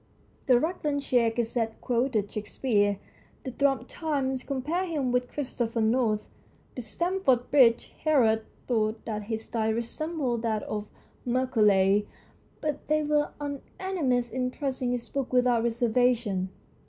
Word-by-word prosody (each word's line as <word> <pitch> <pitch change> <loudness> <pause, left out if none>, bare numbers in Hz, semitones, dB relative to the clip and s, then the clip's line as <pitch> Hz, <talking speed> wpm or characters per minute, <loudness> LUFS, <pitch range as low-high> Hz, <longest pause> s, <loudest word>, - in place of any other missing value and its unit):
The 250 -2 +6
Rutlandshire 285 -7 +1
Gazette 225 -1 -2
quoted 235 -4 0
Shakespeare, 205 -1 0 0.5
the 260 - -4
Thrums 275 +1 +1
Times 275 -5 -1
compared 305 +8 -2
him 280 -6 -1
with 250 0 +1
Christopher 240 -5 -2
North, 220 -1 +1 0.5
the 250 - -5
Stamford 340 - 0
bridge 245 -5 +5
Herald 235 -8 +4 0.3
thought 220 -2 0
that 210 -2 -4
his 220 0 -3
style 220 -1 -1
resembled 245 +1 -2
that 220 -2 -1
of 210 0 -4 0.4
Macaulay, 210 -6 +3 0.5
but 300 -2 -3
they 305 0 +2
were 295 0 +1
unanimous 285 -3 -2
in 250 0 -1
praising 260 -2 -2
his 245 -1 -2
book 275 -3 -3
without 250 -2 +3
reservation. 235 -4 +1
245 Hz, 125 wpm, -28 LUFS, 225-280 Hz, 0.5 s, The